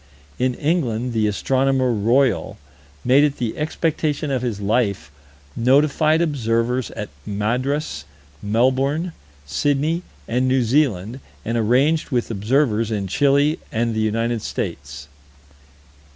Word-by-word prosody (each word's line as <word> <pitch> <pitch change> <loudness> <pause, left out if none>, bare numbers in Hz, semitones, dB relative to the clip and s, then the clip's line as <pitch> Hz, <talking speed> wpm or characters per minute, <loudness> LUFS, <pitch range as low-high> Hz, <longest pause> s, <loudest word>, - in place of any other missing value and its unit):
In 125 0 +1
England, 125 -7 -1
the 110 -2 +1
Astronomer 130 +4 +1
Royal 115 +3 +1 0.5
made 135 +3 +5
it 145 -1 +1
the 115 -3 -2
expectation 155 -1 -1
of 130 -2 0
his 120 -5 -3
life: 100 - 0 0.4
notified 150 +6 +3
observers 125 -4 0
at - - -5
Madras, 115 - -2 0.4
Melbourne, 130 - +1 0.3
Sydney, 145 - 0 0.3
and 125 +3 +1
New 130 0 +2
Zealand, 120 -3 +1 0.3
and 115 - -1
arranged 130 +8 +2
with 120 -4 -1
observers 115 +1 +1
in 105 -3 -2
Chili 140 - +2
and 115 0 0
the 110 - -2
United 115 +1 0
States. 70 -3 -5
125 Hz, 115 wpm, -21 LUFS, 110-140 Hz, 0.5 s, made